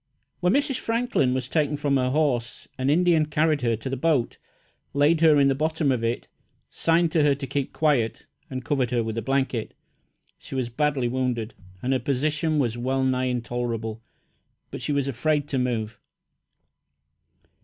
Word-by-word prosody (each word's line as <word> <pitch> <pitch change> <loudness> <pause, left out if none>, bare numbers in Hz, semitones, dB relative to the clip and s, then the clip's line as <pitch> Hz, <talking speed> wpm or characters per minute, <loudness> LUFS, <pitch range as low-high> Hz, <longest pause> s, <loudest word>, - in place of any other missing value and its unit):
When 180 +2 +2
Mrs. 280 -2 +1
Franklin 230 - 0
was 130 -1 -2
taken 150 0 0
from 145 -1 +1
her 125 -1 +1
horse, 130 -5 -1
an 130 +1 -1
Indian 165 0 +3
carried 155 0 +1
her 115 -2 +1
to 110 +4 -7
the 135 - -2
boat, 140 -3 0 0.6
laid 150 +3 +3
her 155 -3 +6
in 140 - +5
the 135 - +3
bottom 155 0 0
of 120 -3 -1
it, 115 +1 -2 0.4
signed 165 0 +2
to 160 - +3
her 145 -1 +4
to 135 0 -6
keep 140 0 -2
quiet, 140 -8 +1 0.2
and 130 -2 -5
covered 130 -4 0
her 120 -1 +1
with 110 -1 -4
a - - -4
blanket. 130 -2 -1 0.6
She - - -9
was 130 -2 -1
badly 135 0 0
wounded, 120 -2 -2 0.3
and 130 +2 +1
her 130 - +1
position 150 +3 0
was 120 -4 0
well 130 +2 0
nigh 130 -1 +1
intolerable, 120 -2 -3 0.7
but - - -6
she - - -2
was 140 -1 0
afraid 145 +3 0
to 135 - 0
move. 115 -3 -2
135 Hz, 175 wpm, -25 LUFS, 125-150 Hz, 0.7 s, her